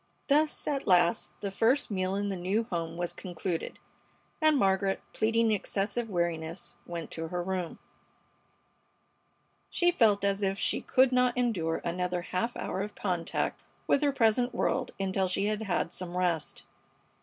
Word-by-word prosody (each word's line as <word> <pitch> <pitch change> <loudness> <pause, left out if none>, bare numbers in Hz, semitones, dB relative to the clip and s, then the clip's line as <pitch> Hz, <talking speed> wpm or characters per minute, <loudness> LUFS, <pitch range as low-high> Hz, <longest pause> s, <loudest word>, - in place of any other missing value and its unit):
Thus, 300 +2 +2
at 280 -2 -1
last, 175 +2 +4
the 200 - -3
first 230 +6 +2
meal 185 -1 0
in 200 0 -1
the 195 - -2
new 190 +5 0
home 170 -6 -4
was 175 0 -2
concluded, 175 -2 -4 0.6
and 310 -1 +5
Margaret, 195 -3 +2
pleading 225 +1 +2
excessive 210 +3 -1
weariness, 170 -2 -2
went 170 -2 -5
to 165 0 -4
her 175 +1 -3
room. 180 -2 -3 1.9
She 350 -1 +3
felt 215 - +3
as 200 0 +1
if 195 -1 0
she - - 0
could 260 0 +4
not 250 -1 +3
endure 190 -10 0
another 180 0 -1
half 230 +7 -2
hour 190 - -3
of 205 +1 -5
contact 175 -4 -2 0.2
with 280 - +3
her 290 -1 +3
present 245 -1 +2
world - - 0
until 190 0 0
she 185 +2 0
had 215 +1 -1
had 180 -4 -1
some 180 -1 -4
rest. 175 -4 -1
195 Hz, 155 wpm, -29 LUFS, 175-225 Hz, 1.9 s, and